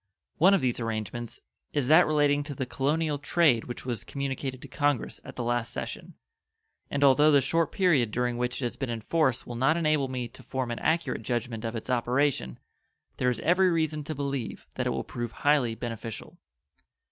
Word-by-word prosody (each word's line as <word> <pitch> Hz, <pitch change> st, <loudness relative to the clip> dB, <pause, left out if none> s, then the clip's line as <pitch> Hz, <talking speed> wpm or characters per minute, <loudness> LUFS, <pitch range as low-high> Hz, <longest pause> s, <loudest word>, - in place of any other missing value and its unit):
One 190 Hz, +4 st, +7 dB
of 195 Hz, -, +1 dB
these 125 Hz, -2 st, 0 dB
arrangements 115 Hz, 0 st, -4 dB, 0.3 s
is 145 Hz, -3 st, +1 dB
that 160 Hz, +4 st, +7 dB
relating 145 Hz, -1 st, +3 dB
to 145 Hz, -1 st, -6 dB
the 130 Hz, -, -2 dB
colonial 145 Hz, +3 st, 0 dB
trade 145 Hz, -6 st, +3 dB
which 120 Hz, -, -7 dB
was 120 Hz, -3 st, -3 dB
communicated 135 Hz, -1 st, -4 dB
to -, -, -8 dB
Congress 145 Hz, -2 st, -1 dB
at -, -, -10 dB
the 120 Hz, -, -3 dB
last 120 Hz, 0 st, -1 dB
session; -, -, -6 dB, 0.7 s
and 140 Hz, 0 st, 0 dB
although 140 Hz, +2 st, +6 dB
the 145 Hz, -, +6 dB
short 160 Hz, +4 st, +1 dB
period 155 Hz, -, +3 dB
during 125 Hz, +2 st, -1 dB
which 125 Hz, +2 st, -1 dB
it -, -, +1 dB
has 120 Hz, -, -4 dB
been 135 Hz, -3 st, -3 dB
in 115 Hz, -1 st, -3 dB
force 130 Hz, 0 st, +1 dB
will 120 Hz, -, -6 dB
not 135 Hz, +7 st, +3 dB
enable 155 Hz, -4 st, +2 dB
me 125 Hz, -2 st, -3 dB
to 115 Hz, -, -15 dB
form 130 Hz, -2 st, -3 dB
an 120 Hz, -, -3 dB
accurate 160 Hz, -8 st, 0 dB
judgment 115 Hz, 0 st, -3 dB
of 115 Hz, 0 st, -3 dB
its 115 Hz, +3 st, -4 dB
operation, 125 Hz, -, +1 dB, 0.6 s
there 125 Hz, -, +2 dB
is 125 Hz, -, -2 dB
every 180 Hz, +2 st, +4 dB
reason 155 Hz, -3 st, 0 dB
to 155 Hz, -, -4 dB
believe 140 Hz, -4 st, -4 dB
that -, -, -2 dB
it -, -, +2 dB
will -, -, -2 dB
prove 120 Hz, -1 st, -5 dB
highly 145 Hz, -6 st, +3 dB
beneficial. 115 Hz, -2 st, -7 dB
130 Hz, 195 wpm, -28 LUFS, 120-150 Hz, 0.7 s, One